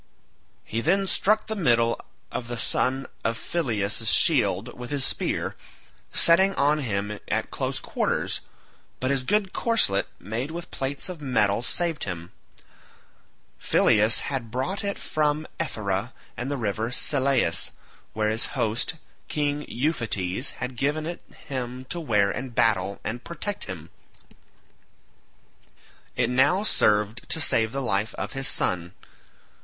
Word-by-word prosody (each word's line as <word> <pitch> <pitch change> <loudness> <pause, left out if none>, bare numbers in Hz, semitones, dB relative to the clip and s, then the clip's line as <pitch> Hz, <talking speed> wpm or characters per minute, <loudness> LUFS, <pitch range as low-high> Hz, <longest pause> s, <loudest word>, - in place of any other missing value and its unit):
He 115 - -2
then 195 +8 +2
struck 215 +3 +2
the 220 - -3
middle 120 - +2 0.3
of 120 - -4
the 120 0 -4
son 130 +3 +1 0.2
of 115 0 0
Phyleus' 110 - 0
shield 115 - +3
with 125 0 -7
his 140 -2 +2
spear, - - -1 0.6
setting 190 +3 +5
on 145 +2 +3
him 105 -5 -2
at - - -1
close - - -2
quarters, - - -1 0.6
but 130 +1 0
his 135 -1 +2
good 200 +7 +1
corslet 220 - +2
made 115 +8 -4
with 170 +2 -7
plates 135 +5 -1
of 180 -4 -7
metal 110 -6 +2
saved 165 +4 -1
him; 85 -2 -6 1.3
Phyleus 110 +2 +4
had 130 -5 -3
brought 130 - -2
it 200 0 -2
from 150 0 0
Ephyra 110 - -2 0.2
and 125 +3 -4
the 145 - -1
river 110 -1 -1
Selleis, 135 +1 +3 0.4
where 110 0 +1
his 110 +1 +2
host, 115 +8 +1 0.3
King 145 0 -1
Euphetes, 120 - 0
had 125 0 -5
given 150 +4 0
it 170 +1 -5 0.3
him 130 -1 -4
to 175 - -2
wear 105 -10 +2
in 130 +4 -4
battle 100 -4 +2
and 120 +3 -4
protect 200 +4 -4
him. 85 -5 -8 2.2
It - - +1
now 145 +10 +4
served 105 - +2
to - - 0
save 115 -6 +3
the 135 +1 -2
life 105 -2 0
of - - -4
his 135 0 0
son. 90 -5 +2
125 Hz, 135 wpm, -26 LUFS, 110-150 Hz, 2.2 s, setting